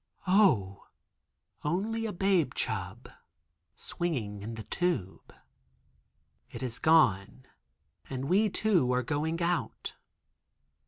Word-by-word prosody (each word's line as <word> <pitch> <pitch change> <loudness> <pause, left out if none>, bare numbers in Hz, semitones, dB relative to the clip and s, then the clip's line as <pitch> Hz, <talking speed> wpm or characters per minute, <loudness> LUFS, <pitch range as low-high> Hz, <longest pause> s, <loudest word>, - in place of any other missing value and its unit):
(Oh, 180 - +3 0.8
only 220 +8 -1
a - - -3
babe 180 -8 +1
chub 100 +2 -3 0.7
swinging 115 - -3
in 115 +3 -6
the 110 - -7
tube.) 120 - -2 1.2
It - - -7
is 120 -3 -3
gone, 130 -7 +3 0.6
and 130 0 -4
we 200 +8 +3
too 185 -11 +2
are 125 0 +1
going 160 +6 -1
out. 175 0 -2
150 Hz, 100 wpm, -30 LUFS, 110-180 Hz, 1.2 s, Oh